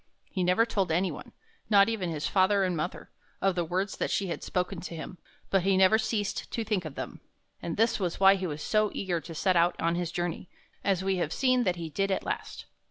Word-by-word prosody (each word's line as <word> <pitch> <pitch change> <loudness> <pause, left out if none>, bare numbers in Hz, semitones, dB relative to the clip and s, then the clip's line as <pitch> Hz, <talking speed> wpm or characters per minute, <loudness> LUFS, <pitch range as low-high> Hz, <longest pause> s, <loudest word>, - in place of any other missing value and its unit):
He 185 - -1
never 180 +6 +4
told 195 -7 -1
any 180 +3 +1
one, - - -9 0.4
not 200 -2 +6
even 215 -6 -1
his 155 -2 -3
father 195 +1 +3
and 180 -2 0
mother, 165 +3 -4 0.3
of 195 -1 +2
the 175 -1 0
words 185 +4 -2
that - - -1
she 195 -2 0
had - - -4
spoken 180 -1 -2
to 170 -1 -6
him, 165 +2 -8 0.3
but 195 - +4
he 190 +1 +2
never 190 +3 +5
ceased 220 -2 -2
to 230 - -2
think 205 -5 -1
of 155 - -7
them; - - -6 0.4
and 170 -1 -4
this 225 +1 +2
was 180 -3 -2
why 195 0 +8
he 190 -2 -2
was 150 -1 -5
so 215 -1 +2
eager 175 -4 -1
to 165 0 -9
set 185 +3 +2
out 170 +1 +3
on 165 0 +1
his 170 -1 -2
journey, 175 0 -3 0.3
as 190 -2 +1
we 190 -1 +1
have 165 -3 -1
seen 255 0 +2
that 180 -2 +1
he 170 -2 -5
did 195 +5 0
at 190 - 0
last. - - -4
185 Hz, 235 wpm, -28 LUFS, 175-200 Hz, 0.4 s, why